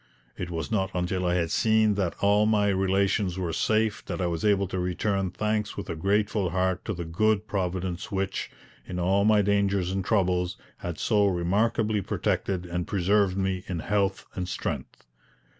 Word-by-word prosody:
It 90 - -5
was 80 0 -4
not 95 -4 +1
until 90 +1 -1
I 90 - +2
had 85 -2 0
seen 110 -1 +3
that 95 -4 -1
all 105 +1 +4
my 105 -2 +3
relations 95 -1 +1
were 90 -3 -2
safe 110 +3 +1
that - - -4
I 90 - 0
was 85 -2 -2
able 100 -2 +3
to 95 - -2
return 95 +2 0
thanks 105 +2 -2
with - - -4
a - - -3
grateful 100 +2 +1
heart 95 +1 0
to 105 - -2
the 85 0 -5
good 105 +5 +1
Providence 90 -2 -3
which, 95 0 -2 0.3
in 90 - -6
all 95 +3 +2
my 105 -1 +5
dangers 100 -2 +1
and 95 0 -1
troubles, 90 -3 +1 0.2
had 85 -2 -5
so 105 -3 +2
remarkably 105 +4 +1
protected 95 0 -1
and 90 0 -3
preserved 100 0 +2
me 95 -1 -1
in 90 - -3
health 95 +2 0
and 90 -1 -4
strength. - - -5
95 Hz, 175 wpm, -27 LUFS, 90-105 Hz, 0.3 s, my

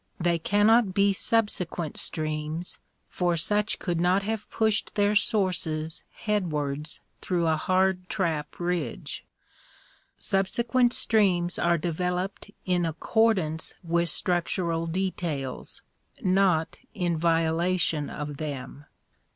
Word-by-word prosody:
They 170 -1 +1
cannot 205 +2 +3
be 200 0 +4
subsequent 185 -7 0
streams, 155 +2 -2 0.3
for 175 -2 0
such 210 +6 0
could 170 -2 -2
not 185 +3 +3
have 215 +1 -3
pushed 220 -1 0
their 205 0 +3
sources 180 -7 0 0.2
headwards 150 -8 -2 0.2
through 175 -2 0
a 160 -1 +3
hard 185 +2 +1
trap 165 -8 -2
ridge. 175 0 -3 0.9
Subsequent 235 +5 +1
streams 185 -6 +2
are 170 0 +3
developed 180 +4 -2 0.2
in 180 -1 +1
accordance 165 -1 +1
with 170 0 +1
structural 170 -1 0
details, 165 -7 -3 0.4
not 185 -4 +2 0.2
in 175 -4 0
violation 165 -1 +1
of 145 -1 -5
them. 145 -1 -6
175 Hz, 100 wpm, -27 LUFS, 160-195 Hz, 0.9 s, be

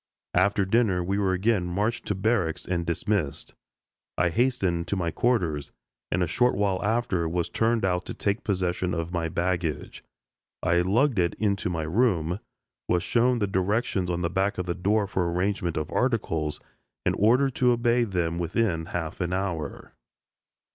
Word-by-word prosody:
After 100 +2 +3
dinner 100 -3 +2
we 100 +3 -1
were 95 -2 +2
again 95 -1 +1
marched 105 +6 -1
to 105 - 0
barracks 95 -5 0
and 85 -2 -2
dismissed. 85 -2 -1 0.6
I 90 - +3
hastened 95 -5 0
to - - -1
my 85 -3 -1
quarters, 85 - 0 0.4
and 90 +1 +2
a - - 0
short 125 +9 +2
while 95 -2 0
after 105 -6 0
was 85 0 -1
turned 115 -1 +1
out 90 -1 0
to - - -5
take 100 +2 -1
possession 90 -2 -1
of 85 0 -3
my 85 -1 -1
baggage. 85 -3 -2 0.6
I 85 +1 +3
lugged 115 +6 +2
it 85 -2 +1
into 100 -3 0
my 80 -3 -2
room, 90 -1 +1 0.5
was 90 0 +1
shown 125 +4 +2
the 105 - +1
directions 95 0 0
on 90 0 -1
the 85 - +1
back 95 +3 0
of 90 - -2
the 90 - -1
door 100 +4 +1
for 90 -3 -1
arrangement 90 -1 -1
of 75 -1 -3
articles, 80 - 0 0.5
and - - +2
ordered 125 +6 +4
to 125 -1 +4
obey 120 0 +2
them 85 -5 -1
within 85 -1 0
half 85 0 -4
an 90 0 -1
hour. 90 -6 -3
95 Hz, 170 wpm, -26 LUFS, 85-110 Hz, 0.6 s, ordered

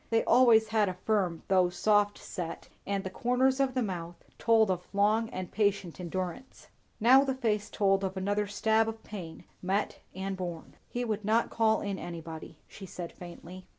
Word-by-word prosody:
They 225 -1 +2
always 230 -3 +5
had 215 -3 +2
a 185 - -5
firm 185 -3 -1
though 185 -2 +4
soft 205 +2 +2
set, 170 -3 -6 0.2
and 200 -1 -1
the 190 - -5
corners 255 +5 +1
of 270 -1 +1
the 255 - +1
mouth 175 -4 -5 0.2
told 225 -3 +4
of 180 -1 -3
long 215 +3 +2
and 185 -1 -6
patient 200 -4 0
endurance. 185 +8 -5 0.3
Now 255 +5 +7
the 265 -2 -1
face 215 -5 -1
told 195 -2 +2
of 190 0 -3
another 205 +2 0
stab 220 +2 +2
of 225 0 -8
pain, 175 -6 -8 0.2
met 195 +3 -1 0.2
and 190 +1 -3
borne. 175 -3 -6 0.2
"He 245 0 -3
would 215 -2 -2
not 220 +3 +1
call 220 -1 +2
in 200 -2 -3
anybody," 165 -2 -8
she 195 - -11
said 175 -1 -7
faintly. 180 +1 -11
200 Hz, 180 wpm, -30 LUFS, 185-225 Hz, 0.3 s, Now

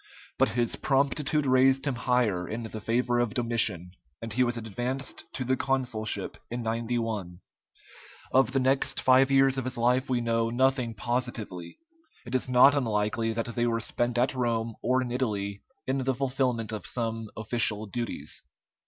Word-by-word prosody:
But - - +4
his 120 -1 +1
promptitude 140 +2 +1
raised 130 +1 +4
him 140 - 0
higher 120 -7 0
in 115 +2 -4
the 110 -1 -7
favor 120 +2 +1
of 120 -1 -1
Domitian, 115 -8 +1 0.3
and 115 -1 -6
he 130 +3 +3
was 120 -1 -1
advanced 120 +5 -4
to 130 - -2
the 130 +1 +2
consulship 125 -6 -1
in 120 0 -4
91. 115 -5 -2 0.9
Of 130 -2 +4
the 135 - +1
next 135 +1 +1
five 130 +1 +5
years 135 -1 +4
of 130 - -4
his 130 - -3
life 125 +3 +2
we 125 -2 +1
know 115 -1 0
nothing 125 -1 +1
positively. 115 -6 -4 0.5
It 120 - -8
is 130 0 0
not 125 +2 +7
unlikely 115 -3 0
that 115 +1 -3
they 120 0 +1
were 115 -1 0
spent 120 +1 -1
at 125 +3 +2
Rome 115 -3 -1
or 130 +1 +2
in 120 - -5
Italy 100 -6 -2 0.2
in 135 +1 0
the 130 0 0
fulfilment 125 -4 -1
of 105 -2 -5
some 115 -2 -3
official 110 -1 0
duties. 105 -9 -4
120 Hz, 165 wpm, -28 LUFS, 115-130 Hz, 0.9 s, not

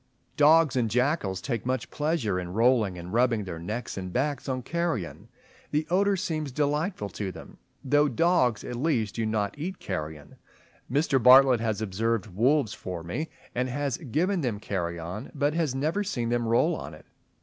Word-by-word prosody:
Dogs 150 -1 +5
and 120 -3 +1
jackals 125 - 0
take 120 -6 -3
much 130 -1 -2
pleasure 145 - 0
in 90 0 -6
rolling 115 -4 +3
and 90 +2 -8
rubbing 120 -2 +2
their 85 -4 -6
necks 105 +8 -5
and 95 -1 -6
backs 140 +3 -1
on 130 -1 -2
carrion. 165 - -3 0.4
The 150 +1 0
odour 200 +2 +3
seems 160 -6 -3
delightful 150 - -1
to 95 0 -4
them, - - -12 0.2
though 145 +2 +3
dogs 130 -4 +2
at 120 - -5
least 120 -7 0
do 115 -1 -1
not 105 -2 -1
eat 185 +5 -4
carrion. 75 -5 -6 0.5
Mr. 140 -1 +2
Bartlett 130 0 +7
has 110 -2 -1
observed 110 +2 -1
wolves 115 +4 +1
for 90 -3 -6
me, 145 - -4 0.2
and 125 +1 -1
has 140 +1 -2
given 170 - 0
them 120 -7 -2
carrion, 90 +2 -4
but 145 +1 +1
has 160 -5 0
never 155 +9 0
seen 125 - -2
them 120 -1 0
roll 115 +1 +3
on - - -7
it. - - -17
125 Hz, 170 wpm, -27 LUFS, 105-150 Hz, 0.5 s, Bartlett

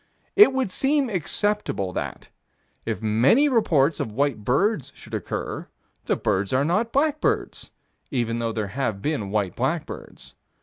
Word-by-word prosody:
It 410 -7 +8
would 265 -7 -1
seem 275 +2 +1
acceptable 190 - -1
that, - - -5 0.6
if - - -3
many 125 - +4
reports 165 - +2
of 110 - -2
white 130 -2 0
birds 140 - +1
should 115 - -14
occur, 105 -4 -4 0.4
the - - +1
birds 95 +1 0
are 130 +2 +2
not 210 +8 +1
blackbirds, 315 +8 0 0.4
even 120 -3 -1
though 115 -1 -1
there 110 -3 -3
have 110 -4 -2
been 145 -10 -1
white 100 -3 -1
blackbirds. - - -4
140 Hz, 140 wpm, -24 LUFS, -, 0.6 s, It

